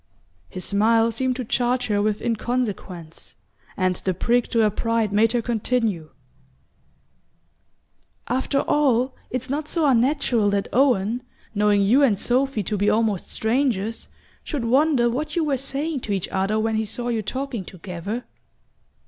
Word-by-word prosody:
His 185 - -5
smile 225 +3 +3
seemed 260 +1 0
to 255 -1 -4
charge 245 +2 0
her 205 -1 +1
with 210 0 -1
inconsequence, 215 -8 -3 0.4
and 185 -1 +1
the 185 -2 -2
prick 240 +6 +1
to 230 - +1
her 215 -1 +3
pride 230 -1 0
made 220 +2 +3
her 240 -1 0
continue: 220 -8 -1 2.2
"After 265 +3 0
all, 260 -3 +2 0.2
it's 255 0 -3
not 290 +3 -3
so 330 -1 0
unnatural 250 -4 +2
that 200 0 0
Owen, 245 -3 +2 0.3
knowing 205 -1 +3
you 240 +8 +4
and 235 -8 +4
Sophy 250 0 0
to 210 +3 -2
be 205 +1 +2
almost 215 -4 0
strangers, 225 -2 0 0.4
should 280 -7 -3
wonder 265 0 +3
what 275 +9 -2
you 340 - +2
were 290 -3 +1
saying 275 +3 -2
to 215 -4 -3
each 190 -3 -2
other 195 +3 0
when 220 0 0
he 220 - 0
saw 240 +3 -3
you 230 -2 0
talking 255 0 -4
together." 185 +6 -6
230 Hz, 150 wpm, -23 LUFS, 205-255 Hz, 2.2 s, you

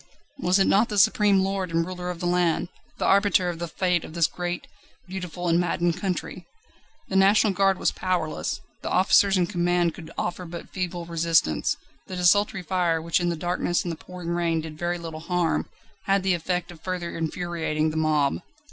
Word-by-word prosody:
Was 185 -6 +3
it 195 - +4
not 215 +4 +3
the 210 - -3
supreme 205 -1 +4
lord 190 -1 -1
and 165 0 +1
ruler 180 0 -5
of 175 -1 -5
the 175 - -3
land, 175 -1 +1 0.3
the - - -1
arbiter 195 -2 +3
of 170 -2 -5
the 170 - -3
Fate 180 0 0
of 155 - -10
this 170 -1 +4
great, 175 +1 -3 0.4
beautiful, 180 -1 -5
and 170 0 +3
maddened 175 0 0
country? 185 -1 -3 0.6
The 195 - -3
National 200 +2 +5
Guard 195 0 +3
was - - +1
powerless; 180 -4 -2 0.2
the - - -4
officers 195 +1 +4
in 180 - +3
command 175 -1 +1
could 160 -4 -10
offer 175 +1 -3
but 170 0 -8
feeble 180 -2 -3
resistance. 165 - +1 0.3
The 185 - -6
desultory 185 +1 +3
fire, 175 -3 +1
which 165 +2 +1
in 175 -1 0
the 170 - -1
darkness 175 +1 -1
and 175 - -3
the - - -4
pouring 180 +1 -8
rain 170 -1 0
did 155 -1 -8
very 175 +2 -2
little 165 -2 -7
harm, 175 0 0 0.4
had 195 -1 +2
the 190 -1 +2
effect 180 +1 -2
of 165 -2 -14
further 180 -2 -4
infuriating 160 -2 -1
the 155 - -4
mob. 150 - +1
175 Hz, 190 wpm, -25 LUFS, 165-185 Hz, 0.6 s, National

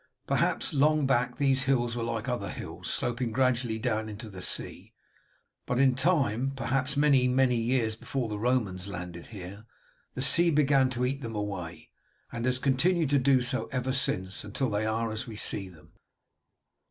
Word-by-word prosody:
Perhaps, - - 0
long 150 +1 +3
back, 125 -1 +1
these 135 -1 +2
hills 120 -3 +1
were 120 - -3
like 115 0 -3
other 120 -6 -2
hills, - - -7
sloping 120 -1 -1
gradually 125 -2 +1
down 110 -1 -2
into 110 +1 -8
the 95 -1 -9
sea; - - -3 0.7
but 125 - -1
in 130 0 +4
time, 135 - +1
perhaps 135 +1 -1
many, 140 -3 +4
many 125 0 +3
years 115 -1 0
before 125 +2 -3
the 105 -1 -5
Romans 105 -6 -1
landed 90 -3 -7
here, 100 +1 -10 0.5
the - - -3
sea 170 +5 +6
began 140 -4 +3
to 125 0 -1
eat 135 +2 -2
them 115 -3 -6
away, 90 -6 -5 0.4
and 115 +1 -3
has 125 0 +2
continued 145 +4 +1
to 140 - +4
do 130 0 +3
so 125 +1 0
ever 130 0 -2
since, 95 -7 -1
until 110 +5 -2
they 105 +1 -1
are 115 +1 -1
as 110 +3 -4
we 110 - -8
see 100 -2 -1
them." 85 -1 -18
125 Hz, 175 wpm, -28 LUFS, 110-135 Hz, 0.7 s, sea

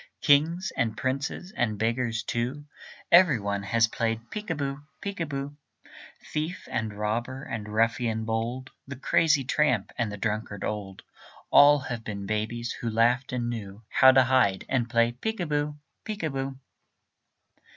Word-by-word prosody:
Kings 160 +6 +3
and 110 -2 -1
princes 140 +8 -3
and 110 -3 0
beggars, 115 +1 0
too, 125 +6 -3 0.5
Every 170 -8 +7
one 100 -1 -2
has 115 +3 +2
played 115 +1 -3
peek 210 0 -6
a 165 - 0
boo, 140 -1 -3 0.2
peek 200 -1 -5
a 165 - -1
boo. 140 0 -5 0.8
Thief 155 +4 -3
and 110 -2 -1
robber 115 +6 -3
and 105 -2 -5
ruffian 115 +1 0
bold, 115 +4 -3 0.2
The 140 - -6
crazy 145 +2 +3
tramp 125 -5 +1
and 115 -3 0
the 105 - -6
drunkard 105 -1 -3
old, 100 -3 -4 0.5
All 145 +1 +8
have 125 -4 -5
been 100 -2 -5
babies 110 +3 -2
who 115 - -4
laughed 120 +4 +2
and 120 -1 -2
knew 110 -2 -6
How 130 0 +7
to 130 0 +6
hide, 125 -7 +2
and 120 -3 0
play 115 0 +3
peek 220 - -4
a 175 - -1
boo, 150 -1 -1 0.3
peek 215 -3 -5
a 160 - 0
boo. 135 0 -4
120 Hz, 160 wpm, -27 LUFS, 110-140 Hz, 0.8 s, All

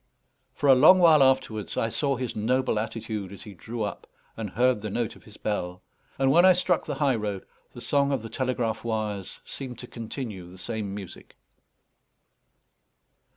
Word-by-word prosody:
For 145 - 0
a 135 - +9
long 155 +8 +8
while 165 -5 +6
afterwards 130 -6 +1
I 115 - +1
saw 140 +4 0
his 125 -2 -4
noble 125 +1 +1
attitude 110 -3 -4
as 100 - -10
he 105 - -10
drew 115 +5 -5
up, 105 - -5 0.3
and 110 -2 -4
heard 125 +1 +2
the 105 - -4
note 115 +2 -2
of - - -18
his 105 -1 -14
bell; 90 -4 -3 0.3
and 135 0 +3
when 170 +5 +6
I 185 0 +8
struck 180 -1 0
the - - -2
high 140 -3 +2
road, 105 -4 -3 0.3
the - - -10
song 140 0 +1
of 130 -5 -1
the - - -5
telegraph 120 -3 -2
wires 110 -4 -3
seemed 130 -3 -7
to - - -8
continue 110 -6 -7
the 90 - -13
same 105 0 -4
music. 100 -4 -10
115 Hz, 180 wpm, -26 LUFS, 105-135 Hz, 0.3 s, a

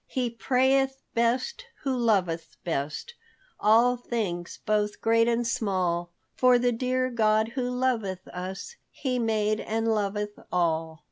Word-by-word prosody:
"He 250 -2 -1
prayeth 265 +3 +2
best 255 - 0 0.2
who 270 -2 0
loveth 185 -9 0
best 155 - -3 0.5
All 235 +4 +5
things 200 -8 -3
both 210 -1 0
great 230 0 +3
and 235 0 +1
small, 185 -7 0 0.2
For 250 -1 +5
the 245 0 +2
dear 255 +2 0
God 220 -1 +2
who 250 0 -2
loveth 230 -7 -1
us 190 - -6
He 255 -3 -2
made 215 -2 +1
and 225 +1 -1
loveth 210 -1 -1
all." 160 -2 0
225 Hz, 130 wpm, -27 LUFS, 195-250 Hz, 0.5 s, All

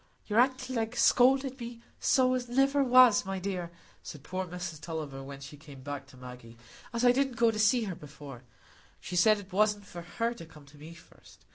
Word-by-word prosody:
"Your 215 +1 +1
aunt 260 +1 +3
Glegg 240 -2 -3
scolded 265 +2 +3
me 235 0 -8 0.2
so 255 -1 +3
as 250 -1 -3
niver 275 +3 +2
was, 250 -3 +6
my 195 -1 -4
dear," 185 -2 -4 0.3
said 145 -3 -10
poor 185 +2 -4
Mrs 175 -3 -7
Tulliver, 155 -5 -6
when 140 0 -10
she 145 +2 -10
came 140 -3 -14
back 140 -1 -6
to 135 - -17
Maggie, 125 -2 -12 0.3
"as 235 +2 -1
I 245 - +7
didn't 265 0 0
go 230 -1 +3
to 215 +3 +2
her 190 - -4
before; 140 -4 -11 0.6
she 180 - -7
said 215 +4 +5
it 200 -2 -12
wasn't 210 0 +1
for 175 -2 -9
her 230 +7 -3
to 170 - -11
come 150 -2 -16
to 145 +1 -18
me 160 +3 -11
first. 170 - -19
195 Hz, 205 wpm, -29 LUFS, 150-245 Hz, 0.6 s, I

